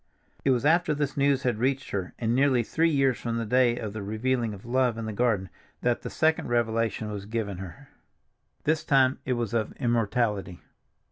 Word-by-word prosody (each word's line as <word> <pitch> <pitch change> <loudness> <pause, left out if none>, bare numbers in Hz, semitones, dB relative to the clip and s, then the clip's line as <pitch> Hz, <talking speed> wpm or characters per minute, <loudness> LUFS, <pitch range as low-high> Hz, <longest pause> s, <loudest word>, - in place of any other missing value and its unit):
It - - +2
was 130 0 +2
after 160 0 +3
this 145 -1 -2
news 140 -1 +2
had 120 -4 0
reached 135 +2 -1
her, 95 -3 -3
and 115 -1 0
nearly 130 -2 +3
three 165 +8 +1
years 135 -4 +2
from 115 -1 -2
the 115 - -2
day 120 +1 +3
of 105 -4 -5
the 110 - -5
revealing 115 +3 -1
of 100 0 -10
love 125 -1 +1
in 115 - -4
the 110 - -4
garden, 105 -4 +1 0.3
that 120 -1 +1
the - - -5
second 160 0 +1
revelation 115 -2 0
was 100 -1 -6
given 105 -4 -3
her. 90 -4 -9 0.8
This 155 0 +1
time 135 -1 +3
it 130 - 0
was 120 -3 -2
of 110 -2 -1
immortality. 115 -6 -1
120 Hz, 195 wpm, -27 LUFS, 110-130 Hz, 0.8 s, after